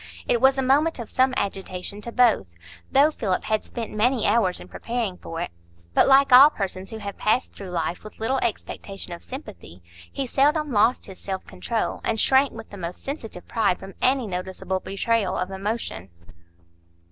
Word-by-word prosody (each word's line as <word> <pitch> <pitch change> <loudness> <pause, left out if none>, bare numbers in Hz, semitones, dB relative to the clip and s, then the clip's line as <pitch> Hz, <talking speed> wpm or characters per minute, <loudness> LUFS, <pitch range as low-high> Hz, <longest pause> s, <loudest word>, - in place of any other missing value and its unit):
It 235 - +2
was 265 +1 +5
a 265 - +1
moment 290 +5 +3
of 235 -3 -7
some 260 0 +3
agitation 195 -1 -4
to 235 - -6
both, 235 - +3 0.4
though 285 +3 +5
Philip 195 -10 -1
had 215 -1 0
spent 230 -2 -6
many 230 +3 +2
hours 205 -4 +2
in - - -11
preparing 230 -5 -3
for 165 -2 -7
it; - - -3 0.4
but - - +5
like 275 0 +6
all 270 +4 +11
persons 190 -6 -4
who 220 - -6
have 200 -2 -7
passed 230 +4 +1
through 195 -2 -9
life 170 -1 -2
with 215 - -12
little 255 +4 0
expectation 195 -5 -4
of 170 - -8
sympathy, 210 - -10 0.3
he 275 - -3
seldom 295 +4 +2
lost 225 +3 +3
his 190 -2 -11
self 190 -1 -5
control, 225 +5 -3
and 220 -1 0
shrank 265 +4 +4
with 225 -1 -10
the 200 - -8
most 175 -1 -6
sensitive 235 - -6
pride 210 -6 +1
from 195 0 -10
any 260 -1 +3
noticeable 190 0 -3
betrayal 195 +1 0
of 185 +1 -2
emotion. 195 - -4
220 Hz, 180 wpm, -24 LUFS, 190-255 Hz, 0.4 s, all